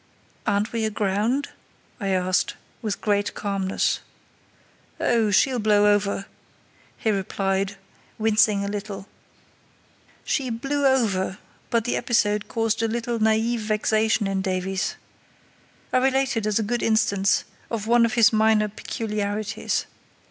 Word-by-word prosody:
"Aren't 205 +2 +1
we 230 -1 -1
aground?" 215 +6 0 0.5
I 200 - -3
asked 185 0 +1 0.3
with 215 -3 -3
great 205 -1 0
calmness. 195 -2 -1 1.0
"Oh, 230 -3 +2
she'll 250 +5 +3
blow 210 -1 +4
over," 200 -1 -1 0.7
he 220 - 0
replied, 195 0 -1 0.4
wincing 215 -2 +3
a - - -3
little. 200 -1 -5 1.2
She 265 -3 -1
"blew 275 +5 0
over", 200 -8 +1 0.3
but 230 -2 +1
the - - 0
episode 210 -3 +1
caused 225 -1 0
a 225 - +2
little 235 +1 -2
naïve 220 +2 +2
vexation 215 0 +1
in 195 -1 -1
Davies. 190 0 -2 1.0
I - - +5
relate 265 0 +2
it 220 -2 -1
as 210 - +1
a 225 - +1
good 240 +3 -1
instance 210 -3 +2 0.3
of 220 -3 -3
one 235 +1 +4
of 230 - +1
his 225 -2 +5
minor 215 -1 +3
peculiarities. 210 -1 -3
215 Hz, 125 wpm, -24 LUFS, 200-230 Hz, 1.2 s, I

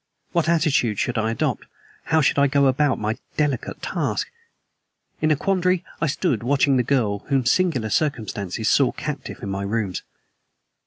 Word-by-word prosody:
What 170 -2 +1
attitude 145 - +2
should 120 +2 0
I 110 0 0
adopt? 115 - -1 0.4
How 160 0 +3
should 140 - +2
I 140 - +5
go 140 0 +3
about 135 +2 +2
my 110 +2 -2 0.2
delicate 145 -5 -1
task? - - -2 0.9
In 155 - +2
a 155 - +4
quandary, 185 +1 +1 0.2
I 165 - +2
stood 145 - 0
watching 135 +2 +2
the - - +4
girl 115 -5 +1
whom 135 -4 +1
singular 130 - +1
circumstances 110 - -1
saw 130 +1 +3
captive 145 -3 -6
in 100 - -4
my 95 0 -3
rooms. 100 -2 -2
135 Hz, 160 wpm, -23 LUFS, 110-155 Hz, 0.9 s, I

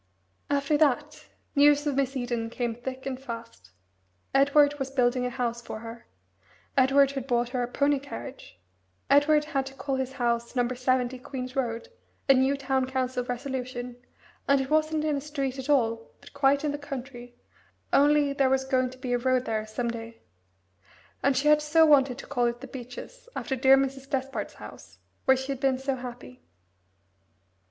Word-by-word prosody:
After 285 +1 +1
that, 295 0 +1 0.3
news 290 +1 +5
of 290 - +1
Miss 270 0 0
Eden 240 -2 -2
came 235 0 -2
thick 260 +3 -7
and 265 -1 -4
fast. 230 - -9 0.6
Edward 285 +1 +4
was 270 0 -2
building 250 -1 +1
a - - -2
house 240 -1 -2
for 220 -2 -7
her. 230 +1 -10 0.7
Edward 275 +1 +5
had 270 -2 -5
bought 240 -2 +1
her 250 0 -2
a 240 - -1
pony 280 +3 +1
carriage. 275 - -9 0.5
Edward 295 +1 +5
had 270 -3 -2
to 270 - -10
call 270 -1 -2
his 265 0 -3
house 235 -2 -1
No. 245 -1 +2
70, 255 0 0
Queen's 255 0 -6
Road 235 -4 -2 0.4
a 270 - +8
new 265 +2 +2
Town 265 -1 0
Council 255 -1 -1
resolution 250 -1 -4 0.5
and 280 0 +4
it 270 +2 -3
wasn't 310 0 +2
in 300 -2 +1
a - - -3
street 275 -2 -3
at 265 +2 -6
all, 230 -5 +1
but - - -16
quite 280 0 +3
in 300 - 0
the 290 - -4
country, 255 -4 -8 0.6
only 290 0 +4
there 275 -1 +2
was 265 0 +1
going 255 -1 +1
to 255 - -13
be 255 -1 -3
a 245 - +2
road 255 0 +1
there 220 -1 -2
some 235 +2 -2
day. 230 0 -8 1.0
And 280 -1 +2
she 290 - +1
had 300 0 +6
so 320 +2 +4
wanted 270 -4 +4
to - - -9
call 245 -4 0
it 235 +1 -3
the - - -6
Beeches, 265 - -10
after 265 - -2
dear 265 +1 +6
Mrs. 270 0 -2
Despard's 270 -1 -3
house, - - -12 0.3
where 265 -1 +5
she 265 +1 -4
had 270 - -4
been 265 -1 +2
so 270 +1 -2
happy. 245 - -9
265 Hz, 180 wpm, -27 LUFS, 245-280 Hz, 1.0 s, a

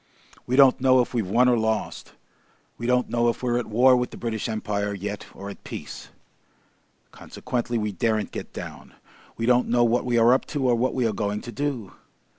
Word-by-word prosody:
We 125 - 0
don't 135 -2 +6
know 130 -1 +5
if 120 - -4
we've 110 -6 -1
won 120 +5 +4
or 125 - +4
lost. 110 -1 -2 0.6
We 120 - -5
don't 125 0 +2
know 120 0 +1
if 115 - -4
we're 120 -1 +1
at 125 - -5
war 125 +4 +5
with 125 0 -1
the - - -11
British 115 -1 -3
Empire 105 -2 -2
yet 100 +1 -6
or 100 - -8
at 100 - -9
peace. - - -8 1.0
Consequently, 120 -1 -4
we 105 -1 -2
daren't 110 +2 -1
get - - -7
down. - - -9 0.4
We 115 - -2
don't 125 +1 +3
know 120 0 +3
what 120 +1 +2
we 125 -1 0
are 115 +2 +6
up 130 - +1
to 135 -2 +1
or 125 - +4
what 120 +2 0
we 125 -2 +1
are 110 - 0
going 105 0 -2
to 120 - -8
do. 125 -4 -4
120 Hz, 210 wpm, -24 LUFS, 110-125 Hz, 1.0 s, don't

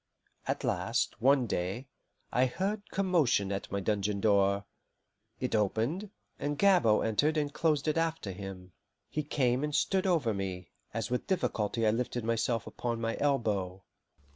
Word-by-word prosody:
At - - -1
last, - - -1
one 135 0 +4
day, 95 +4 -2 0.5
I 130 +1 +3
heard 200 - -3
commotion 165 - +2
at 100 0 -4
my 100 - -1
dungeon 100 0 0
door; 100 -1 +3 0.7
it 125 - -2
opened, 115 - 0 0.3
and 145 0 -2
Gabord 165 - +4
entered 145 +8 +2
and 145 -1 -1
closed 155 -2 +1
it 155 - +1
after 165 -11 -1
him. 95 -1 -8 0.4
He 155 - -1
came 130 -3 +1
and 150 -1 -1
stood 190 +5 +2
over 155 - +2
me, 95 -2 -4 0.2
as - - -3
with 125 - -1
difficulty 115 - 0
I 110 - +5
lifted 120 +1 -2
myself 115 0 0
upon 120 -1 -3
my 115 0 -1
elbow. 105 -10 0
120 Hz, 150 wpm, -31 LUFS, 100-150 Hz, 0.7 s, I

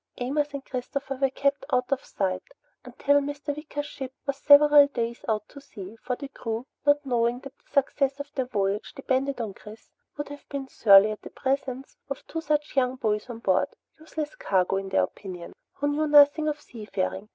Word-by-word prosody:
Amos 290 +4 0
and 275 - -6
Christopher 270 +2 -4
were 270 - +4
kept 280 +2 0
out 250 0 +1
of 275 - 0
sight 185 -2 -2 0.4
until 285 0 +2
Mr. 290 0 -4
Wicker's 290 -1 -5
ship 265 -3 -7
was 280 - -1
several 290 0 +8
days 235 -3 -3
out 215 -1 0
to 280 - -12
sea, 205 -6 -10
for 250 0 -2
the 280 - -7
crew, 230 -3 -5 0.2
not 290 0 +4
knowing 240 -1 +1
that 275 0 -11
the - - -34
success 275 0 +1
of 285 +1 -7
their 260 -2 -2
voyage 200 -3 -1
depended 275 0 -1
on 220 -4 -3
Chris, 215 +3 -14 0.3
would 290 - -4
have 290 -1 -11
been 275 -2 -4
surly 205 -3 +6
at 215 - -7
the - - -9
presence 265 0 -3
of 275 - -5
two 325 - -4
such 300 -2 -1
young 255 -1 +2
boys 215 -2 -1
on 240 - -6
board, 190 0 +2 0.3
useless 310 -1 -5
cargo, 190 0 +1
in 195 0 -4
their 190 - +3
opinion, 180 -4 -7 0.2
who 290 - -2
knew 300 +2 +1
nothing 295 +1 +6
of 300 0 -1
seafaring. 210 -5 -4
270 Hz, 195 wpm, -26 LUFS, 225-285 Hz, 0.4 s, several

